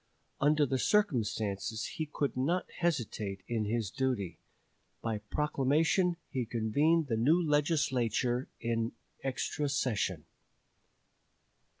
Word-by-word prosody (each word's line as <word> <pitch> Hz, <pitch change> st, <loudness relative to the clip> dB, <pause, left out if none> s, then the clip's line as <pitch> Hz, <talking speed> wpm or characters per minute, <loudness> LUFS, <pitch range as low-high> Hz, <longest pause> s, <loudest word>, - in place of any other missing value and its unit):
Under 150 Hz, +1 st, +4 dB
the 130 Hz, -1 st, 0 dB
circumstances 110 Hz, -, +1 dB
he 155 Hz, -, -3 dB
could 145 Hz, -2 st, -1 dB
not 160 Hz, +8 st, +1 dB
hesitate 110 Hz, -, -1 dB
in 115 Hz, -3 st, 0 dB
his 110 Hz, -2 st, -1 dB
duty. 110 Hz, -11 st, -1 dB, 0.6 s
By 110 Hz, -2 st, -1 dB
proclamation 150 Hz, -, +1 dB
he 130 Hz, -4 st, 0 dB
convened 140 Hz, +9 st, +2 dB
the 120 Hz, -5 st, -1 dB
new 150 Hz, +10 st, +4 dB
Legislature 135 Hz, -, +1 dB
in 115 Hz, 0 st, -1 dB, 0.3 s
extra 135 Hz, +2 st, -1 dB
session. 105 Hz, -, 0 dB
130 Hz, 100 wpm, -32 LUFS, 110-150 Hz, 0.6 s, Under